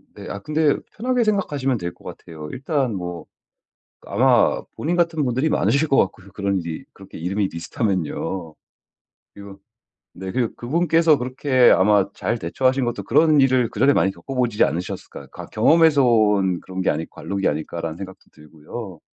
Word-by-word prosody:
네. - - -10
아 100 - -5
근데 155 +3 +1 0.2
편하게 250 +2 0
생각하시면 145 - 0
될 85 -2 -5
것 - - -23
같아요. 80 -2 -9
일단 135 -2 -1
뭐 90 -2 -6 0.8
아마 - - +3
본인 170 +4 -1
같은 165 -4 +1
분들이 130 +5 0
많으실 150 0 +1
것 135 - +3
같고요, 95 +1 0
그런 100 -1 -1
일이 80 -1 -6
그렇게 95 0 -12
이름이 95 +4 -1
비슷하면요. 85 -2 -3 0.8
그리고 100 -1 -11 0.6
네. 95 0 -6
그리고 120 +1 -1
그분께서 165 +3 +2
그렇게 130 0 +3
아마 100 0 +4
잘 120 - -2
대처하신 130 +9 0
것도 120 -4 -3
그런 150 +6 +4
일을 130 -3 +3
그전에 135 +7 +3
많이 95 - +2
겪어 90 +11 -9
보지 120 -4 +1
않으셨을까요. 85 +6 -3
가 - - -10
'경험에서 150 +4 +4
온 105 -6 +3
그런 95 0 -5
게 - - +2
아닐 80 +2 -2
관록이 100 -1 -2
아닐까.'라는 80 +2 -4
생각도 95 0 -10
들고요. 80 +5 -10
110 Hz, 370 characters per minute, -22 LUFS, 95-140 Hz, 0.8 s, 아마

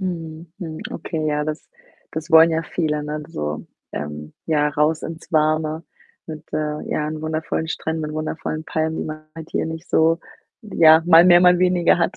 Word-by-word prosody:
Mhm, 165 -3 -6
mhm. 160 -4 -6
Okay, 155 -1 -4
ja, 150 0 0
das 155 0 -5 0.4
das 160 +2 -6
wollen 160 +1 +8
ja 165 0 0
viele, 150 -2 -2
ne? 150 +1 -4
D 150 - -14
so, 75 - -4 0.3
ähm, 75 +1 -6
ja, 150 -2 +2
raus 150 +2 0
ins 165 +1 -8
Warme 155 0 +1 0.4
mit, 155 -1 -8
äh, 150 0 -2
ja, 150 - -1
'n 155 0 -5
wundervollen 160 0 -2
Stränden, 160 -1 -3
wundervollen 155 0 -4
Palmen, 160 0 -2
die - - -3
man 155 0 -7
halt 160 -1 -10
hier - - -1
nicht 160 +1 -7
so 165 +1 +3 0.5
ja, 160 -5 +6
mal 170 -1 +8
mehr, 175 -1 +7
mal 180 0 +5
weniger 180 -1 +3
hat 175 +2 0
160 Hz, 185 wpm, -21 LUFS, 155-165 Hz, 0.5 s, wollen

